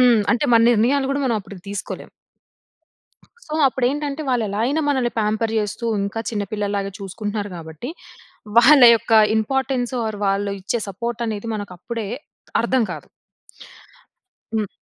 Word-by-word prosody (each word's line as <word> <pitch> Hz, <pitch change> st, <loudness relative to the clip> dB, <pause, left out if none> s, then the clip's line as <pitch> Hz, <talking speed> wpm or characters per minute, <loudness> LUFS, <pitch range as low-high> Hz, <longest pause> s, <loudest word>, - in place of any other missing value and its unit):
హ్మ్. 245 Hz, -3 st, +6 dB
అంటే 240 Hz, -, 0 dB
మన 230 Hz, -, +6 dB
నిర్ణయాలు 265 Hz, +5 st, +2 dB
గూడా 280 Hz, 0 st, -1 dB
మనం 235 Hz, -3 st, +1 dB
అప్పటికి 185 Hz, -2 st, -12 dB
తీసుకోలేం. 200 Hz, -, -6 dB, 1.4 s
సో, 305 Hz, -, -7 dB
అప్పుడేంటంటే 280 Hz, +4 st, -1 dB
వాళ్లెలా 215 Hz, -5 st, 0 dB
అయినా 290 Hz, +5 st, 0 dB
మనల్ని 255 Hz, -4 st, +1 dB
పేంపర్ 220 Hz, +1 st, 0 dB
జేస్తూ 215 Hz, +2 st, -2 dB, 0.2 s
ఇంకా 200 Hz, +3 st, -3 dB
చిన్న 210 Hz, -3 st, -2 dB
పిల్లలాగా 200 Hz, -2 st, -2 dB
చూసుకుంటున్నారు 205 Hz, +1 st, -4 dB
కాబట్టి 160 Hz, -, -8 dB, 0.7 s
వాళ్ళ 270 Hz, +3 st, +8 dB
యొక్క 225 Hz, -, -5 dB, 0.3 s
ఇంపార్టన్స్ 260 Hz, +2 st, -1 dB
ఆర్ -, -, -1 dB
వారు 215 Hz, -2 st, -5 dB
వాళ్ళు 200 Hz, +1 st, 0 dB
ఇచ్చే 210 Hz, +5 st, -1 dB
సపోర్ట్ 235 Hz, +4 st, -4 dB
అనేది 215 Hz, 0 st, -4 dB
మనకప్పుడే 205 Hz, +2 st, -6 dB, 0.5 s
అర్థం 240 Hz, +1 st, +2 dB
కాదు. -, -, -8 dB, 1.5 s
హ్మ్. 215 Hz, -2 st, 0 dB
225 Hz, 135 wpm, -21 LUFS, 205-250 Hz, 1.5 s, వాళ్ళ